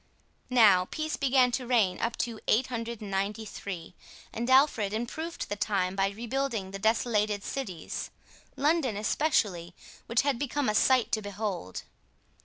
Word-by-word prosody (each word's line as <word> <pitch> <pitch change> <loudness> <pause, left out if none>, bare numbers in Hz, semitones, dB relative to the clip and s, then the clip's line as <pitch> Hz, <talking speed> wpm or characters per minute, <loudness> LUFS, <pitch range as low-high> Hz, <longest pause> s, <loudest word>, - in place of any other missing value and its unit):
Now 210 -7 +6
peace 310 +9 -3
began 260 -2 +3
to 250 0 -2
reign 215 -7 +2
up 230 0 -2
to 230 -2 -8
893, 215 -6 -2 0.4
and 235 +2 -3
Alfred 260 -7 +4
improved 315 +9 -4
the 205 - -3
time 195 -3 0
by 195 0 +2
rebuilding 230 -1 -3
the 195 - -6
desolated 215 -1 +1
cities, 190 - -5 0.5
London 290 -7 +1
especially, 205 - 0 0.3
which 235 +2 +2
had 275 -4 0
become 285 -2 -1
a - - +1
sight 255 +3 +3
to 215 - +1
behold. 200 - -4
225 Hz, 130 wpm, -29 LUFS, 200-255 Hz, 0.5 s, Now